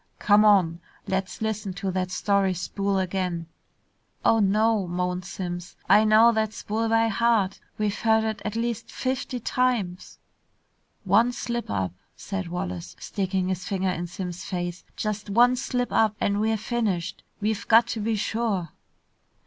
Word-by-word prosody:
"Come 210 0 +5
on. 185 -6 +4 0.3
Let's 190 +2 -2
listen 215 -3 -2
to 190 +1 -3
that 185 0 -1
story 195 0 +1
spool 195 +3 -1
again." 180 -2 -1 0.8
"Oh, 225 - +5
no," 210 0 +2
moaned 180 +1 -2
Simms. 175 -2 -6
"I 215 +1 +6
know 220 +2 +6
that 220 -1 0
spool 225 +2 -2
by 225 0 +3
heart! 220 -3 +1 0.2
We've 210 0 -1
heard 220 -1 +3
it 220 -1 -2
at 215 - -3
least 230 -1 -2
fifty 255 -1 -2
times!" 230 -7 -1 0.9
"One 215 +5 +4
slip 240 -1 -4
up," 95 -3 -1 0.2
said 195 -2 -4
Wallace, 90 - -5
sticking 190 -2 -2
his 185 -1 -3
finger 190 -2 0
in 175 -1 -3
Simms' 175 0 -6
face, 175 -1 -4
"just 210 -1 -3
one 240 +4 +5
slip 250 -1 -2
up 215 -1 +3
and 200 0 +1
we're 220 0 +1
finished! 210 -6 -2 0.2
We've 215 +1 -2
got 230 +1 +6
to 225 - -2
be 220 +1 0
sure!" 210 -5 -1
205 Hz, 150 wpm, -25 LUFS, 185-225 Hz, 0.9 s, I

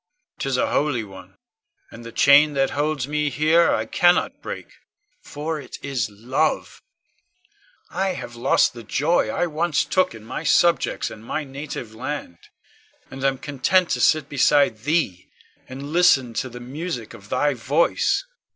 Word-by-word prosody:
'Tis 135 -2 -1
a - - 0
holy 145 -6 0
one, 95 -2 -13 0.6
and 120 - -11
the 115 - -9
chain 145 +4 +5
that 135 -1 +1
holds 145 -2 -1
me 150 0 0
here 155 +5 +3
I 110 - 0
cannot 175 +9 +2
break, - - -6 0.6
for 155 +2 -5
it - - -10
is 130 -6 -2
love. 130 +10 -2 1.1
I 190 -1 -1
have 120 -8 -8
lost 120 - +2
the 120 - -9
joy 145 +10 +1
I - - 0
once 165 -1 0
took 185 -10 +1
in 110 - -12
my 150 - -5
subjects 170 +1 +2
and 110 0 -11
my 155 +6 -3
native 135 -5 -7
land, 125 - -6 0.7
and 135 0 -8
am 135 -1 +1
content 150 +7 +1
to - - 0
sit 155 -3 +3
beside 140 -4 +3
thee, 150 - 0 0.4
and 140 +3 -7
listen 135 -9 +4
to 130 - -3
the 125 0 -9
music 130 -1 -6
of 100 +1 -14
thy 145 +3 +1
voice. 140 - +1
Ione. - - -43
140 Hz, 160 wpm, -22 LUFS, 120-155 Hz, 1.1 s, chain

